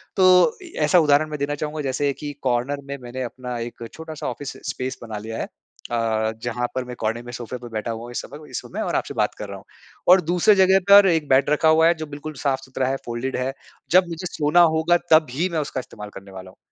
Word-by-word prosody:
तो 185 - +5
इ 345 - -12
ऐसा 155 +4 +5
उदाहरण 150 0 +3
मैं 150 -1 -5
देना 145 +1 -1
चाहूँगा 150 +1 -4
जैसे 140 +1 0
कि 145 +1 -6
कॉर्नर 130 +3 0
में 140 0 -5
मैंने 125 +1 -6
अपना 125 0 -6
एक 115 0 -6
छोटा-सा 160 -2 -7
ऑफिस 135 +3 -6 0.2
स्पेस 130 0 -4
बना 110 -2 -6
लिया 110 +2 -6
है। - - -2 0.5
अ, 110 -1 0
जहाँ 120 0 -1
पर 130 - -1
मैं 125 0 -7
कोने 115 +2 -1
में 120 - -9
सोफे 120 +1 -6
पे 120 0 -10
बैठा 110 +1 -2
हुआ 115 0 -6
हूँ 120 - -9
इस - - -3
समय 145 - -10
औ 155 - -13
इस - - -4
समय - - -6
और - - -2
आपसे - - -2
बात - - 0
कर - - -5
रहा - - -6
हूँ। - - -15 0.4
और 185 +1 +8
दूसरे 180 +5 +3
जगह 190 0 +5
पर 200 0 +9
1 160 -4 +1
बेड 135 +2 +4
रखा 150 +2 +3
हुआ 160 +1 +5
है 170 - +5
जो 155 -1 -5
बिल्कुल 150 +1 -7
साफ़-सुथरा 130 -1 -1
है 135 - 0
फोल्डेड 120 +3 -3
है। 130 +1 -2 0.4
जब 180 +1 +5
मुझे 165 +2 -6
सोना 155 +2 +3
होगा 165 +2 +3
तब 155 -1 +6
ही 170 +8 -1
मैं 165 - -1
उसका 145 -3 -3
इस्तेमाल 105 -4 -9
करने 95 0 -11
वाला 95 0 -10
हूँ। - - -26
140 Hz, 250 wpm, -23 LUFS, 120-160 Hz, 0.5 s, पर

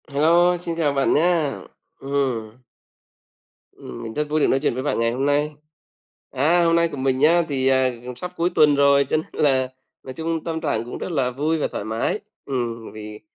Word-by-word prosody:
Hello, 170 +5 +3
xin 170 -1 -2
chào 150 -4 +1
bạn 135 -1 +2
nhá. 160 -3 +2 0.5
Ừm. 130 -5 -3 1.1
Ừm, 60 - -10
mình 110 - -6
rất 150 +2 -2
vui 155 +1 +1
được - - +3
nói 135 - +2
chuyện 145 - 0
với 130 +2 -4
bạn 145 - -1
ngày 115 0 +2
hôm 130 +3 -2
nay. 145 +1 +1 0.8
À, 165 +6 +2
hôm 165 0 +3
nay 170 0 +3
của 155 - -8
mình 130 -1 0
nhá, 165 +5 +4
thì, 135 -2 -1
à, 130 -1 +3
cũng 125 0 -7
sắp 180 +7 -6
cuối 170 +2 +1
tuần 150 -1 +5
rồi 140 0 +4
cho - - +2
nên 155 - -3 0.2
là 130 -2 +2 0.3
nói 130 - -8
chung 160 +3 -3
tâm 160 -1 -3
trạng 115 -8 -1
cũng 120 - -7
rất - - -5
là 135 -5 0
vui 150 +5 -1
và - - -1
thoải - - -5
mái. 110 - -1 0.3
Ừm, 120 -4 -4
vì 105 0 -9
140 Hz, 210 wpm, -22 LUFS, 130-160 Hz, 1.1 s, tuần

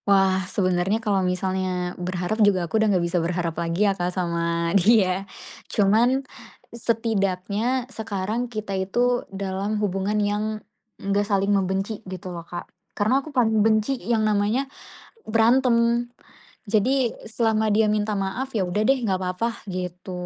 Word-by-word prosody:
Wah, 195 -1 +4
sebenarnya 185 +1 +1
kalau 210 -4 0
misalnya 180 -1 -1
berharap 180 +4 -2
juga 195 -4 +4
aku 220 +6 0
udah 220 - +3
gak 170 - 0
bisa 170 0 0
berharap 170 0 -1
lagi 170 +5 +1
ya, 200 - +3
Kak 180 -2 -2
sama 170 -1 -1
dia. 195 -1 +3 0.4
Cuman 235 +7 +3 0.5
setidaknya 225 +1 -1
sekarang 220 +2 -3
kita 215 -3 -5
itu 245 +6 +1
dalam 195 +2 -3
hubungan 205 0 -1
yang 205 0 0 0.5
gak 200 +1 -1
saling 200 0 +2
membenci 195 +2 -1
gitu 185 -1 -6
loh, 170 - -6
Kak. 175 0 -6 0.3
Karena 250 +7 +2
aku 310 - -10
paling 225 -6 +2
benci 220 +4 +2
yang 220 +2 +1
namanya 215 +5 +1 0.6
berantem. 235 +1 +3 0.7
Jadi, 245 +3 +2 0.2
selama 220 -1 +1
dia 215 0 +3
minta 210 0 0
maaf, 205 +7 -3
ya 205 - +2
udah 180 +3 -1
deh 270 - +5
nggak 190 -3 0
apa-apa 185 +4 -1 0.2
gitu. 180 0 -5
205 Hz, 140 wpm, -24 LUFS, 185-225 Hz, 0.7 s, deh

